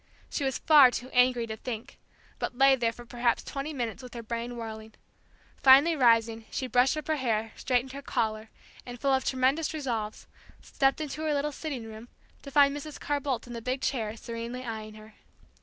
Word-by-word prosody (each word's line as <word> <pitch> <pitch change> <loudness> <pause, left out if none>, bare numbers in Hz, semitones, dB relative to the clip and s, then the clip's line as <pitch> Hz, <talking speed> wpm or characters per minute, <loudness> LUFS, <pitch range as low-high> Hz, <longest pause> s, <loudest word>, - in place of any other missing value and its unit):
She 290 - -2
was 265 -1 0
far 295 -5 +7
too 245 +1 -6
angry 250 -1 +3
to 220 -1 -5
think, 225 0 -7 0.4
but 245 - -4
lay 270 0 +6
there 235 -3 0
for 240 +1 -12
perhaps 240 0 0
twenty 280 +2 -5
minutes 240 -6 -4
with 250 -1 -11
her 235 - -6
brain 235 +2 -4
whirling. 220 -1 -8 0.7
Finally 280 +5 +7
rising, 230 -4 +3
she 265 - -3
brushed 255 +4 +3
up 305 - -5
her 315 -1 +1
hair, 225 -4 -1
straightened 255 0 0
her 275 +1 -7
collar, 220 -4 -2 0.3
and, 245 -1 -9
full 275 +1 +2
of 265 0 +2
tremendous 270 +5 +1
resolves, 230 -8 -3 0.3
stepped 270 +2 0
into 305 0 -5
her 310 -1 0
little 290 +1 -1
sitting 280 -5 -5
room, 220 +1 -10 0.3
to 280 - -9
find 280 0 +4
Mrs. 295 +1 -7
Carr 290 0 -1
Boldt 265 -4 -2
in 240 - -9
the 230 - -6
big 255 +3 -2
chair, 225 -5 -2
serenely 235 +2 -6
eyeing 215 -2 -6
her. 215 0 -14
250 Hz, 195 wpm, -28 LUFS, 230-275 Hz, 0.7 s, far